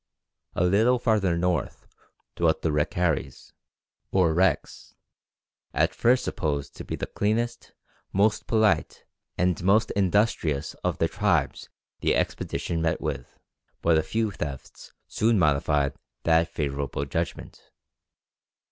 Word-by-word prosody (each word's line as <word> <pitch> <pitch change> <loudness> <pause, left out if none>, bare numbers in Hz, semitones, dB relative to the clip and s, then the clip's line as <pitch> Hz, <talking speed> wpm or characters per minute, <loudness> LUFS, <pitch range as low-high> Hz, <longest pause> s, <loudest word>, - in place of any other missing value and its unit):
A - - +1
little 110 +7 +4
farther 105 -8 +1
north 85 -4 -1 0.5
dwelt 80 -2 +1
the 80 - +1
Ricaris, 75 +2 -1 0.6
or 90 -4 +3
Recs, 95 +3 0 0.8
at 80 +1 +2
first 125 +8 +3
supposed 75 -7 -3
to - - -6
be - - -4
the - - -4
cleanest, 115 +3 -2 0.4
most 105 +2 +1
polite, 110 -3 +1 0.3
and 90 -1 +1
most 105 +4 +3
industrious 95 -7 +1
of - - -1
the - - +2
tribes - - 0 0.3
the - - +1
expedition 85 -1 -2
met 80 -1 0
with; - - -5 0.5
but 85 -1 +4
a 80 - +4
few 110 +6 -1
thefts 75 -8 -7 0.2
soon 110 0 +2
modified 75 -3 +2 0.3
that 80 0 +3
favourable 70 -2 -3
judgment. 70 - -5
85 Hz, 120 wpm, -26 LUFS, 80-105 Hz, 0.8 s, little